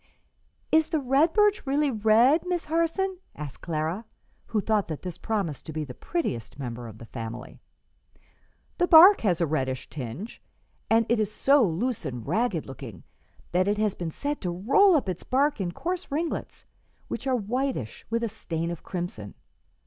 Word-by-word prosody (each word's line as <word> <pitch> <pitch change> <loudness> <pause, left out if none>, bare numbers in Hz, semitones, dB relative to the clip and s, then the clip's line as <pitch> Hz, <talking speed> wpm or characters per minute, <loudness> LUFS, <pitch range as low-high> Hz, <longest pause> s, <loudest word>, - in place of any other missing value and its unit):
"Is 315 0 +4
the 320 - +1
red 275 +4 +3
birch 415 -4 +3
really 285 +1 +2
red, 230 +7 +4
Miss 355 -2 -1
Harson?" 335 +4 0 0.2
asked 150 -3 -8
Clara, 165 +5 -2 0.4
who 220 - 0
thought 210 -1 +1
that 155 -3 -6
this 180 -3 -6
promised 195 -11 -3
to 160 - -6
be 155 0 -2
the 135 -4 -8
prettiest 125 - -3
member 120 -3 -6
of 110 -1 -11
the 115 - -11
family. 115 +1 -7 1.2
"The 355 - +3
bark 355 +5 +9
has 180 -6 +1
a 170 - +3
reddish 130 -4 -2
tinge, 140 - -7 0.5
and 225 +1 +4
it 235 -1 +2
is 215 -1 0
so 275 +5 +4
loose 210 +6 -1
and 125 -6 -5
ragged 185 - 0
looking 125 - -9 0.5
that 185 +2 +2
it 205 +1 +1
has 215 -2 +1
been 170 -2 -4
said 290 - -4
to 180 - -2
roll 275 - +4
up 280 - +1
its 180 -2 -3
bark 280 -1 +1
in 175 -2 -2
coarse 360 - -4
ringlets, 320 +4 -3 0.4
which - - -5
are 260 - +2
whitish 245 - -2
with 230 +1 0
a - - +1
stain 170 -5 -4
of 170 - -6
crimson. 175 - -6
210 Hz, 175 wpm, -26 LUFS, -, 1.2 s, bark